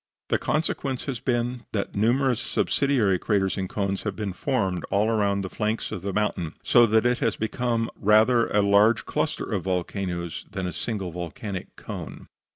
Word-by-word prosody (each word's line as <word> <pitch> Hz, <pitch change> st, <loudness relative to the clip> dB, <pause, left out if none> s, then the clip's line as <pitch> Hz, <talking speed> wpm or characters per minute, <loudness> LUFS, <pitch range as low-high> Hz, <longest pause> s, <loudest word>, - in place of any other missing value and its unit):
The -, -, +2 dB
consequence 145 Hz, -4 st, -1 dB
has 130 Hz, -5 st, -3 dB
been, 120 Hz, 0 st, -1 dB
that 100 Hz, -2 st, -2 dB
numerous 120 Hz, +3 st, +2 dB
subsidiary 120 Hz, -10 st, +1 dB
craters 95 Hz, -2 st, +1 dB
and 95 Hz, -2 st, -3 dB
cones 100 Hz, -1 st, -1 dB
have 105 Hz, -3 st, -3 dB
been 105 Hz, -3 st, -3 dB
formed 95 Hz, -, -1 dB
all 105 Hz, +3 st, +1 dB
around 100 Hz, -3 st, +1 dB
the -, -, -3 dB
flanks 110 Hz, +1 st, -2 dB
of 90 Hz, -, -4 dB
the 100 Hz, -, -3 dB
mountain, 95 Hz, -5 st, -1 dB
so 120 Hz, -1 st, +6 dB
that 110 Hz, +1 st, +3 dB
it 125 Hz, 0 st, +2 dB
has 115 Hz, -, +1 dB
become 115 Hz, +1 st, -1 dB
rather 110 Hz, +3 st, +4 dB
a 105 Hz, 0 st, +2 dB, 0.4 s
cluster -, -, -2 dB
of -, -, -2 dB
volcanoes 90 Hz, -2 st, -3 dB
than 95 Hz, -3 st, -4 dB
a 90 Hz, -, -3 dB
single 100 Hz, -4 st, -3 dB
volcanic 90 Hz, +3 st, -6 dB
cone. -, -, -8 dB
105 Hz, 165 wpm, -25 LUFS, 95-120 Hz, 0.4 s, so